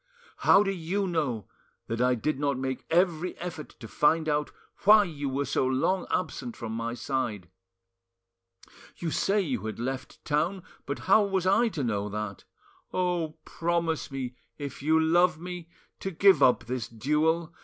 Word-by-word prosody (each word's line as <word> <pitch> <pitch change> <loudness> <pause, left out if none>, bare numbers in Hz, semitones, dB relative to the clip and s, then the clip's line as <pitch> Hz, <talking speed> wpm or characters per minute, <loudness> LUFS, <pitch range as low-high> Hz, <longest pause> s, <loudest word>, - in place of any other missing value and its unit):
How 200 - +6
do 195 - 0
you 190 +2 -2
know 145 - -1 0.4
that 115 +1 -3
I 125 0 +3
did 135 +4 -2
not 140 -2 0
make 130 0 -4
every 175 0 +1
effort 170 -4 -6
to 115 - -8
find 155 +9 +2
out 150 -1 0 0.3
why 210 +1 +7
you 145 -6 -4
were 140 +2 -1
so 130 - +1
long 155 +9 +1
absent 140 -9 -3
from 115 -1 -5
my 115 +1 -3
side? 115 -9 -3 1.5
You 165 -2 -3
say 205 +6 +2
you 125 - -2
had 110 - -5
left 130 +2 -5
town 170 +5 0 0.2
but 140 - -3
how 195 +3 +6
was 190 -2 -1
I 200 +6 +4
to 160 -10 -3
know 105 -3 -1
that? 105 -1 -5 0.5
Oh! 175 -4 -1
promise 170 -1 -1
me, 130 -3 -4 0.2
if 140 -2 -6
you 160 +3 +3
love 165 0 +3
me, 175 -1 -7 0.3
to 195 - -3
give 190 -2 +5
up 125 -3 +5
this 120 0 -3
duel! 155 +7 0
155 Hz, 165 wpm, -28 LUFS, 125-175 Hz, 1.5 s, why